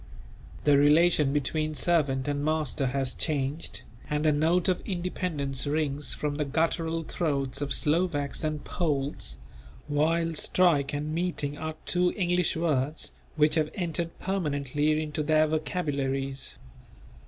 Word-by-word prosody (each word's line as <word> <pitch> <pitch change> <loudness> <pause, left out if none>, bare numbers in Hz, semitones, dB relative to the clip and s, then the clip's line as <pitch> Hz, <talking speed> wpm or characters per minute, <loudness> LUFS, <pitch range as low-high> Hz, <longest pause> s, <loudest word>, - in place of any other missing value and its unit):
The 145 -1 +5
relation 150 0 +5
between 155 +2 -1
servant 145 -6 +2
and 145 0 -1
master 155 -3 0
has 135 0 -1
changed, 140 -6 -2 0.3
and 150 +1 0
a 155 - +5
note 165 +4 +2
of 185 -2 +1
independence 165 -8 -2
rings 145 -1 0
from 145 -1 -2
the 150 - +1
guttural 165 +3 0
throats 140 -5 -2
of 145 -1 -2
Slovaks 155 -2 +1
and 155 -1 -2
Poles; 145 -5 -2 0.5
while 165 +3 +1
"strike" 155 -3 +2
and 150 +1 -3
"meeting" 165 -4 -1
are 155 +1 -5
two 180 0 +2
English 180 -2 +1
words 150 -2 0 0.2
which 150 0 +4
have 155 -2 +2
entered 170 -2 -3
permanently 150 -4 0
into 150 0 -3
their 155 +1 +3
vocabularies. 140 -4 -2
150 Hz, 130 wpm, -28 LUFS, 145-165 Hz, 0.5 s, The